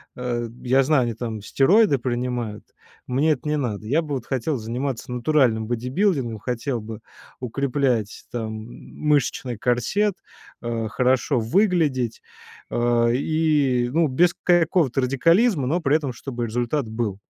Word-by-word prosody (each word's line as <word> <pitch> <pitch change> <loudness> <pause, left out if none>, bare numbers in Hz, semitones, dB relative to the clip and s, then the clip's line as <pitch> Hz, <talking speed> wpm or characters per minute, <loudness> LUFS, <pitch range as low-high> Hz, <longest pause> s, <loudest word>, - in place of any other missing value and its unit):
Э, 120 -1 -3
я 130 +2 +3
знаю, 130 -5 +2
там 115 -2 -5
стероиды 145 - +4
принимают. 120 -3 -3 0.4
Мне 145 +5 +2
это 145 +1 -7
не 150 - +1
надо. 110 -7 -3
Я 150 +7 +2
бы 150 -3 -4
вот 125 - -5
хотел 135 +2 -1
заниматься 120 +3 -4
натуральным 125 -3 +2
бодибилдингом. 125 - 0
Хотел 125 +3 -3
бы 110 0 -8 0.4
укреплять 125 -3 -1
там, 115 -2 -3
м, 110 +1 -9 0.2
мышечный 130 -4 +1
корсет. 150 - +1 0.5
А, 115 -2 -2
хорошо 130 +3 +1
выглядеть, 140 - +1 0.5
а, 120 0 +2
и, 140 -2 +1
э, - - -6
ну, 165 +3 +3
без 170 +6 +3
к - - -47
какого-то 170 -6 +3
радикализма. 165 - +3
Но 170 +6 0
при 145 -1 +2
этом 140 -5 -4
чтобы 120 -1 -5
результат 120 +3 -1
был. 110 -3 -3
125 Hz, 140 wpm, -23 LUFS, 120-150 Hz, 0.5 s, стероиды